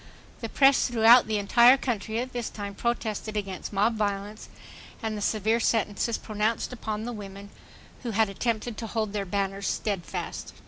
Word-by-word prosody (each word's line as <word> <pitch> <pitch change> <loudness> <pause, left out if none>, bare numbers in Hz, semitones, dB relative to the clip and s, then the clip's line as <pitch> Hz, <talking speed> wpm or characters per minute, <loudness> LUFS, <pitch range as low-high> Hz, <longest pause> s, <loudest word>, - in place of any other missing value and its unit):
The 230 - -5
press 270 +2 +4
throughout 235 0 +6
the 215 -1 0
entire 235 +5 +6
country 225 -4 -3
at 255 +2 -3
this 240 -2 -3
time 200 -1 -6
protested 215 -1 -2
against 195 -3 -4
mob 215 +3 +1
violence 205 0 -3 0.5
and 220 -1 -2
the 210 - -5
severe 220 +2 +1
sentences 225 0 0
pronounced 215 +3 -2
upon 220 -3 -4
the 240 +1 -4
women 200 -1 -9 0.5
who 245 - -4
had 220 0 +2
attempted 220 +2 -2
to 225 - -5
hold 215 -2 -2
their 205 -2 -2
banners 195 +1 -2
steadfast. 195 -5 -4
215 Hz, 165 wpm, -27 LUFS, 200-235 Hz, 0.5 s, throughout